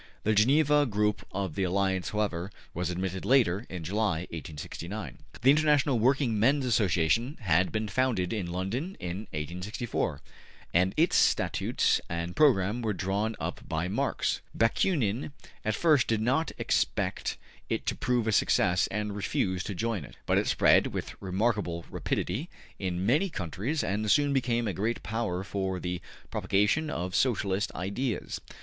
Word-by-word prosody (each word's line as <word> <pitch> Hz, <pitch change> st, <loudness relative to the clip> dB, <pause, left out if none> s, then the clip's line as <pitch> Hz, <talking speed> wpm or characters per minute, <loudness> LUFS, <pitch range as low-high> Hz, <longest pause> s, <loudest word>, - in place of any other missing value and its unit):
The 110 Hz, -, +2 dB
Geneva 145 Hz, +6 st, +4 dB
group 105 Hz, -2 st, 0 dB
of 95 Hz, -4 st, -3 dB
the 95 Hz, -, -3 dB
Alliance, 95 Hz, 0 st, 0 dB
however, 100 Hz, -4 st, -1 dB, 0.2 s
was 90 Hz, 0 st, -2 dB
admitted 95 Hz, +1 st, -3 dB
later, 115 Hz, -5 st, +3 dB
in 90 Hz, -3 st, -6 dB
July, 100 Hz, -1 st, 0 dB
1869. 80 Hz, -, -6 dB, 0.2 s
The 135 Hz, -, +8 dB
International 145 Hz, -4 st, +3 dB
Working 125 Hz, -2 st, +2 dB
Men's 135 Hz, +5 st, +3 dB
Association 110 Hz, -, +2 dB
had 90 Hz, -2 st, +2 dB
been 110 Hz, 0 st, -1 dB
founded 110 Hz, -4 st, 0 dB
in 95 Hz, -6 st, -3 dB
London 115 Hz, -, -3 dB
in 90 Hz, +5 st, -5 dB
1864, 90 Hz, -, -3 dB, 0.5 s
and 90 Hz, +2 st, +3 dB
its 165 Hz, +2 st, +3 dB
statutes -, -, +2 dB
and 85 Hz, +1 st, -3 dB
program 120 Hz, -6 st, +3 dB
were 110 Hz, -2 st, 0 dB
drawn 100 Hz, +4 st, -1 dB
up -, -, -4 dB
by 80 Hz, +2 st, -1 dB
Marx. 95 Hz, -, -1 dB, 0.2 s
Bakunin 120 Hz, -, +1 dB, 0.3 s
at 110 Hz, -1 st, 0 dB
first 150 Hz, -5 st, +4 dB
did 115 Hz, -1 st, +1 dB
not 130 Hz, +9 st, +1 dB
expect -, -, 0 dB, 0.3 s
it -, -, -2 dB
to -, -, +1 dB
prove 125 Hz, -2 st, 0 dB
a 110 Hz, -, +1 dB
success 90 Hz, -3 st, +3 dB
and 105 Hz, 0 st, -3 dB
refused 95 Hz, -2 st, -1 dB
to 100 Hz, -, -4 dB
join 110 Hz, -3 st, -1 dB
it. -, -, -13 dB
But -, -, +3 dB
it -, -, -1 dB
spread -, -, +4 dB
with -, -, -5 dB
remarkable 95 Hz, -3 st, -1 dB
rapidity 130 Hz, -, -2 dB, 0.3 s
in 90 Hz, -1 st, -2 dB
many 150 Hz, -, +3 dB
countries 110 Hz, -, -2 dB
and 105 Hz, +3 st, -1 dB
soon 145 Hz, +6 st, +4 dB
became 120 Hz, -3 st, +1 dB
a 100 Hz, -, -1 dB
great 110 Hz, +7 st, -2 dB
power 110 Hz, -5 st, -2 dB
for 95 Hz, -2 st, -2 dB
the 90 Hz, 0 st, -3 dB, 0.3 s
propagation 105 Hz, +11 st, +1 dB
of 90 Hz, -, -3 dB
Socialist 105 Hz, -3 st, +1 dB
ideas. 105 Hz, +7 st, -3 dB
105 Hz, 150 wpm, -29 LUFS, 90-120 Hz, 0.5 s, The